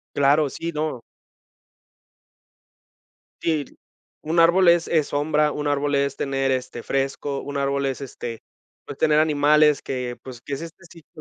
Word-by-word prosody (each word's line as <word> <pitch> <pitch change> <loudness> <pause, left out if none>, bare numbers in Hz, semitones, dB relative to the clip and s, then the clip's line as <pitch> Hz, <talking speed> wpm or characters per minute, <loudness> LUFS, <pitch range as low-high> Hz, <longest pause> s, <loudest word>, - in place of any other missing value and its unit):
Claro, 145 +2 +3
sí, 165 +5 -5
no. 150 -5 -3 2.4
Sí, 155 -3 0 0.6
un 165 +2 +1
árbol 175 +2 +5
es 170 -1 +4
es 155 -3 +1
sombra. 150 +1 +1
Un 150 0 -4
árbol 145 0 0
es 140 0 0
tener, 135 -1 -1
este, 125 -2 -3
fresco. 135 +1 -2
Un 145 0 -6
árbol 140 0 0
es, 135 0 -3
este, 120 -4 -7 0.6
tener, 150 -1 +3
pues, - - +6
animales 150 -1 +3
que, 125 -2 -4
pues, 125 -3 -10
que 140 - -5
es 135 - -6
este 165 +2 -11
ciclo 165 -5 -17
145 Hz, 150 wpm, -23 LUFS, 135-155 Hz, 2.4 s, pues